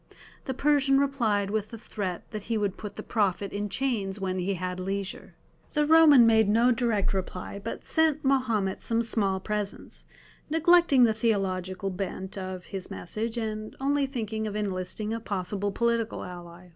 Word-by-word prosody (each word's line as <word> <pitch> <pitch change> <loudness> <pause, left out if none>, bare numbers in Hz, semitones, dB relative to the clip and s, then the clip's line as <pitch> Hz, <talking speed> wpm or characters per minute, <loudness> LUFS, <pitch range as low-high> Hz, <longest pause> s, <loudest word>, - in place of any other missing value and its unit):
The 265 - -3
Persian 275 -1 +3
replied 230 -8 +1
with 215 0 -1
the 230 - -8
threat 195 -5 -4
that 215 -2 -4
he 225 - +1
would 205 -3 -1
put 210 -2 -8
the - - -6
Prophet 200 -3 0
in 205 0 -2
chains 210 -6 -1
when 185 -1 -2
he 190 +2 -1
had 180 0 -4
leisure. 195 +1 -4 0.4
The 300 -1 +2
Roman 305 -5 +7
made 220 -2 +4
no 230 +4 +4
direct 230 -5 +1
reply, 190 +1 -4
but 230 - -5
sent 315 -2 +2
Mahomet 230 -8 +1
some 230 0 0
small 200 -4 0
presents, 210 0 -5 0.4
neglecting 325 -4 +5
the 225 -2 +5
theological 195 -3 -1
bent 190 0 -5
of 185 -2 -6
his 195 -2 -6
message, 225 +6 -4
and 215 -1 -4
only 280 +1 +1
thinking 220 -4 -3
of 210 - -5
enlisting 205 +1 -3
a 230 - -2
possible 200 -1 -2
political 230 +1 0
ally. 175 0 -10
215 Hz, 165 wpm, -27 LUFS, 195-240 Hz, 0.4 s, Roman